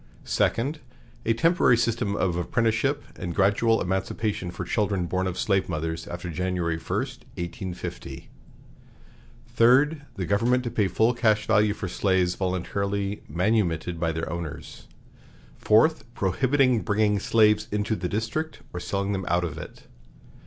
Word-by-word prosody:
Second. 140 +7 0 0.5
A 115 - +4
temporary 165 -4 +4
system 115 -3 0
of 90 -4 0
apprenticeship 115 +9 0 0.2
and 90 -2 -4
gradual 105 +3 +3
emancipation 95 +1 -2
for - - -6
children 100 -4 0
born 95 +2 -1
of 90 -1 -4
slave 95 0 +1
mothers 80 +1 -3
after 85 0 -5
January 90 -1 -1
1, - - -19
1850. 90 +1 -5 1.2
Third. 140 +6 +4
The 95 -4 -3
government 120 +6 +2
to 120 - -3
pay 105 -4 +1
full 110 +6 +2
cash 110 -3 +2
value 105 -1 +3
for 95 - -4
slaves 90 -1 +1
voluntarily 100 +2 -2
manumitted 90 -1 0
by 80 -1 0
their 80 +1 -3
owners. 85 -2 -7 0.7
Fourth. 155 +10 +4
Prohibiting 130 +5 +2
bringing 105 -1 +1
slaves 105 0 +3
into 105 +1 0
the 90 -4 -3
District, 115 +10 -3
or 90 - -4
selling 100 +2 -2
them 95 -2 -2
out 85 0 +2
of 80 -4 -4
it. - - -10
100 Hz, 140 wpm, -26 LUFS, 90-115 Hz, 1.2 s, A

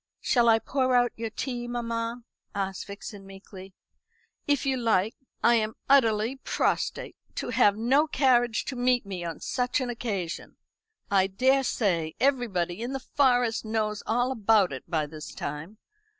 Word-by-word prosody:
"Shall 240 -3 +3
I 225 - +6
pour 255 +2 0
out 245 -1 +3
your 225 0 -4
tea, 240 +2 -4
mamma?" 235 0 -3 0.3
asked 195 -1 -3
Vixen 200 0 -8
meekly. 195 -1 -12 0.7
"If 285 -3 +1
you 270 -1 +1
like. 225 -4 +1 0.3
I 240 - +6
am 215 0 -1
utterly 230 -2 +3
prostrate. - - -1 0.2
To - - -3
have 205 0 +4
no 265 +7 +3
carriage 245 -6 +2
to 265 - -4
meet 245 -1 +2
me 190 -3 -5
on 165 -2 -5
such 250 +2 -1
an 250 -2 -2
occasion! 200 -8 -4 0.6
I 190 -1 +4
daresay 200 -7 +1
everybody 225 -9 0
in 245 +3 -3
the 270 - -2
Forest 245 -4 +2
knows 215 -1 -1
all 245 +3 +1
about 215 - +3
it 130 - -9
by 155 -3 0
this 155 +1 -9
time. 150 +8 -6
225 Hz, 150 wpm, -27 LUFS, 195-250 Hz, 0.7 s, I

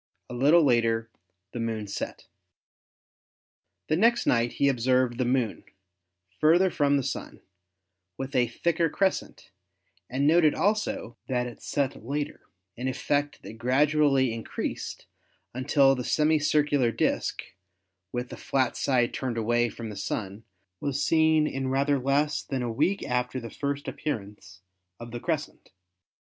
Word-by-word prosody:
A - - -5
little 145 +7 +5
later 115 -3 +2 0.4
the 120 - -6
Moon 115 -2 -2
set. 100 - -6 1.6
The 155 - +2
next 230 +7 +3
night 120 0 +2
he 140 - +2
observed 125 -1 +2
the 125 - +2
Moon 125 -3 0 0.8
further 175 +4 +4
from 145 -1 +2
the 135 - -1
Sun, - - -5 0.8
with 135 +1 -5
a 125 -1 +3
thicker 165 +7 0
crescent, 190 +4 -2 0.6
and 135 +3 0
noted 155 0 +5
also 205 - -1
that 125 -2 0
it 120 -2 -9
set 140 -6 -2
later, 145 +4 -4 0.3
an 125 +2 -4
effect 145 +2 -1
that 105 +4 -10
gradually 135 0 +3
increased 115 -1 -5 0.5
until 135 +2 +3
the 125 -2 -3
semi 155 +4 +2
circular 145 -4 +2
disk, - - -1 0.7
with 125 0 -3
the - - -8
flat 130 -2 0
side 125 -3 +1
turned 125 -3 -3
away 120 +1 +1
from 115 -2 -7
the - - -8
Sun, 100 +1 -4 0.4
was 140 0 -1
seen 160 -1 +4
in 135 -3 -2
rather 140 +2 +1
less 145 +3 +1
than 130 -2 -3
a 120 - -2
week 195 - +1
after 125 +1 -1
the 115 -2 -8
first 140 0 -3
appear 150 -6 -2
ance 100 -2 -15 0.4
of 120 0 -9
the 120 - -5
crescent. 155 +1 -4
130 Hz, 145 wpm, -27 LUFS, 120-150 Hz, 1.6 s, little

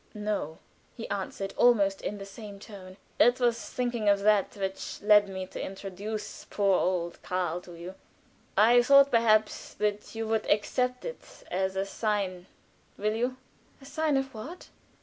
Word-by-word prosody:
"No," 210 -7 -3 0.4
he 230 - -6
answered, 195 0 -4
almost 200 -5 +4
in 210 - -4
the 195 - -8
same 200 0 -10
tone. 190 -3 -11 0.2
"It 245 +1 +5
was 240 -2 0
thinking 240 -4 0
of 200 0 +3
that 210 0 +2
which 195 -1 -4
led 210 -1 +6
me 190 -1 -5
to - - -7
introduce 195 +2 -6
poor 200 -2 +2
old 175 -2 -1
Karl 180 -1 -2
to 175 -1 -12
you. 175 +2 -8 0.6
I 235 +4 +7
thought, 275 +2 +6
perhaps, 215 -2 +2
that 210 +1 -2
you 225 0 -3
would 220 -1 -1
accept 250 +4 0
it - - -6 0.3
as 190 +1 -1
a 195 0 0
sign 195 -3 -2 0.5
will 210 +1 0
you?" 245 +3 -1 0.4
"A 270 - -15
sign 305 0 0
of 270 0 -2
what?" 285 +12 -9
210 Hz, 160 wpm, -28 LUFS, 195-235 Hz, 0.6 s, I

